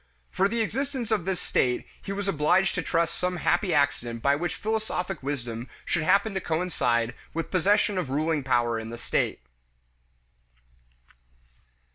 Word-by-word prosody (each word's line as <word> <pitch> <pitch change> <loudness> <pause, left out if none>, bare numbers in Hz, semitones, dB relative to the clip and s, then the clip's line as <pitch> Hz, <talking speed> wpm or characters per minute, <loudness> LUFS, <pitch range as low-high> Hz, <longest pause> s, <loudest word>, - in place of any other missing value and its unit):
For 190 - +3
the 230 +2 -1
existence 255 +1 -2
of 205 -6 +1
this 190 -1 -1
state 125 -7 +1 0.2
he - - -6
was 200 0 -3
obliged 180 +2 +3
to 180 - -1
trust 165 0 +1
to - - -8
some 180 0 0
happy 175 +3 +1
accident 120 -6 +1
by 140 0 +4
which 170 +3 -2
philosophic 210 -5 -2
wisdom 120 -4 -4 0.2
should 170 - 0
happen 200 +6 +3
to 190 - -2
coincide 125 -10 0 0.2
with 165 -1 -3
possession 195 +1 +3
of 165 -7 -3
ruling 155 +2 +1
power 120 -3 +2
in 110 0 -6
the 120 - -6
state. 120 - -1
175 Hz, 155 wpm, -27 LUFS, 135-195 Hz, 0.2 s, by